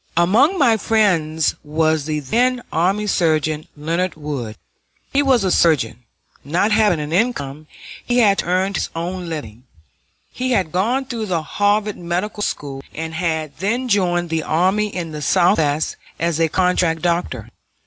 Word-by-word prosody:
Among 220 - +4
my 240 -8 +4
friends 175 -8 +1
was 155 0 0
the 155 -1 -1
then 245 - +1
Army 190 +6 +1
Surgeon 155 -5 0
Leonard 170 +5 -1
Wood. 140 -8 -5 0.6
He 280 - +4
was 265 -6 +3
a 190 - +1
surgeon. 125 -9 +2 0.4
Not 175 +9 +1
having 210 -6 +3
an 150 +1 -4
income, 155 - -1 0.4
he 245 - 0
had 205 -5 +4
to - - -1
earn 185 +2 +1
his - - -2
own 175 +1 -4
living. 125 -7 -7 0.7
He 255 0 -1
had 185 -8 0
gone 235 - 0
through 230 -4 -4
the 170 -4 -1
Harvard 205 +4 0
Medical 180 +5 -3
School, 140 -8 -3
and 160 +1 -5
had 160 -4 -2
then 235 +7 -1
joined 175 -5 +1
the 165 -1 0
army 190 +7 +1
in 175 -5 -5
the 150 -1 -6
Southwest 155 -1 +2 0.2
as 170 -1 0
a 165 -1 +2
contract 180 -2 +1
doctor. 170 - -1
175 Hz, 155 wpm, -20 LUFS, 155-210 Hz, 0.7 s, Among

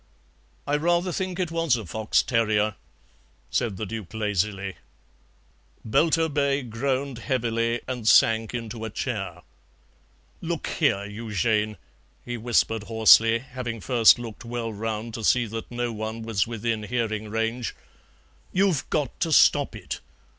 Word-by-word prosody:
"I 145 +1 +1
rather 175 +3 +1
think 185 0 -3
it 175 -3 -1
was 165 -5 +2
a 115 -3 -5
fox 110 +5 +1
terrier," 110 -3 +1 0.8
said 110 -5 0
the 110 - -3
Duke 105 -2 -7
lazily. 100 -2 -1 1.1
Belturbet 140 -1 +1
groaned 130 +2 -2
heavily, 115 -2 0
and 125 -4 -4
sank 115 -1 +5
into 115 -1 -5
a 110 - -3
chair. 95 -7 -4 1.0
"Look - - -3
here, 100 +1 +1
Eugène," 105 0 -1 0.5
he 120 - -4
whispered 115 -2 +1
hoarsely, 115 0 +6
having 120 -2 -6
first 115 +4 +5
looked 115 -1 -8
well 115 -1 -4
round 110 +1 -4
to 115 -1 -5
see 120 +3 +3
that 115 +1 -6
no 120 -1 -2
one 110 +1 -5
was 110 -3 0
within 115 -1 -2
hearing 110 -1 -2
range, 115 +2 -2 0.8
"you've 185 -6 +1
got 145 -5 -1
to 165 - 0
stop - - +5
it. - - -6
115 Hz, 130 wpm, -25 LUFS, 110-125 Hz, 1.1 s, hoarsely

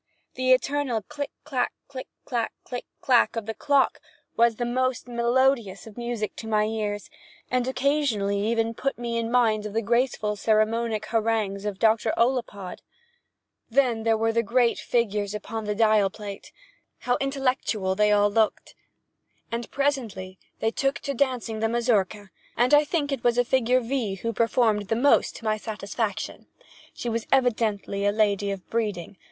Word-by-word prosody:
The 255 0 +1
eternal 255 -3 +1
click 290 +1 -5
clak, 265 -4 -1 0.2
click 260 -2 -8 0.2
clak, 235 -3 -2
click 245 - -6 0.2
clak 245 -2 +3
of 225 -2 -3
the 225 - -3
clock 280 +3 +2 0.4
was 235 -1 +4
the 240 - -2
most 255 +1 -1
melodious 240 -2 +1
of 220 -2 -12
music 235 -3 -4
in 220 - -6
my 210 -1 +3
ears, 210 -2 -3 0.4
and 250 0 +1
occasionally 260 -7 +1
even 230 0 +1
put 275 +4 -2
me 235 -1 -2
in 230 0 -2
mind 225 -3 +2
of 205 - -9
the 225 - +1
graceful 235 -2 +1
sermonic 220 +1 +1
harangues 220 -3 0
of 205 -2 -3
Dr. 220 +1 +2
Ollapod. 230 -7 -1 0.9
Then 245 -2 +2
there 225 0 +2
were 225 +1 +1
the 230 - +3
great 235 +2 +2
figures 210 -3 0
upon 220 +1 -5
the 210 0 -1
dial 215 -2 +4
plate—how 245 - -7
intelligent - - -10
how - - +2 0.2
intellectual, 225 -7 0
they 210 +2 +3
all 205 0 +4
looked! 220 0 0 0.8
And 235 +1 -3
presently 225 -10 -2 0.2
they 225 - +1
took 275 +3 0
to 280 - -3
dancing 250 -4 -1
the 225 0 +1
Mazurka, 215 -4 0 0.3
and 245 +4 +3
I 295 0 +7
think 295 -2 -1
it 270 -4 -3
was 240 -1 +3
the 245 0 +2
figure 255 0 +3
V. 230 -5 -2
who 230 +4 -3
performed 225 -2 +2
the 225 - +1
most 275 +5 +3
to 225 - -10
my 215 0 +1
satisfaction. 210 -1 -4 0.4
She - - -6
was 230 -1 -2
evidently 220 -6 +1
a 205 - +3
lady 205 -1 +1
of 195 -2 -5
breeding. 205 -5 -2
230 Hz, 165 wpm, -25 LUFS, 210-250 Hz, 0.9 s, I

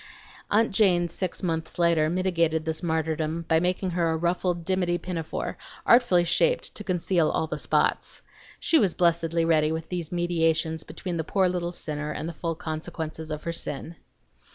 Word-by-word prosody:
Aunt 225 +2 +3
Jane 185 -4 +3
six 180 +3 -4
months 160 -2 -2
later 170 -3 +3
mitigated 170 -3 +1
this 160 0 -1
martyrdom 160 0 -1
by 160 - +4
making 180 +2 0
her 170 -1 +1
a 160 - 0
ruffled 175 0 -1
dimity 180 -2 +1
pinafore, 170 -3 -4 0.3
artfully 235 -8 +5
shaped - - +1
to 210 - -7
conceal 180 -3 +1
all 160 - 0
the 160 - -5
spots. - - 0 0.4
She 325 - +3
was 195 -6 +2
blessedly 170 -1 +2
ready 155 -2 +3
with 160 0 -4
these 175 -3 -4
mediations 165 -2 +1
between 170 +2 -5
the 160 - -1
poor 190 +3 +2
little 175 -1 -2
sinner 150 -3 -4
and 155 +1 -4
the 170 - -5
full 165 +1 -3
consequences 160 0 -5
of 155 0 -5
her 170 - -3
sin. 165 +1 -4
170 Hz, 170 wpm, -26 LUFS, 160-180 Hz, 0.4 s, artfully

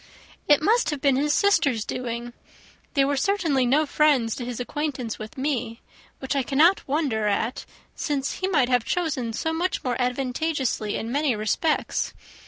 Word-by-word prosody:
"It 295 0 +5
must 460 +7 +3
have 300 -2 -2
been 275 -1 +3
his 295 +3 +1
sisters' 290 - +2
doing. 240 -1 -4 0.6
They 275 -1 +4
were 285 +1 0
certainly 295 -6 +1
no 295 +5 +3
friends 280 -7 +2
to 250 - -5
his 245 -1 -5
acquaintance 260 -3 -3
with 215 +3 -9
me, 255 -4 -2 0.4
which 265 +1 -3
I 275 - +2
cannot 305 +9 +3
wonder 270 -7 0
at, 220 +4 -1 0.3
since 280 -3 -2
he 375 - -1
might 295 -10 +2
have 250 -2 +2
chosen 300 -9 -1
so 320 +8 -2
much 350 +3 -1
more 250 -2 -1
advantageously 255 -2 -1
in 225 - -4
many 285 -2 +1
respects. 215 +9 -1
270 Hz, 165 wpm, -24 LUFS, 245-305 Hz, 0.6 s, It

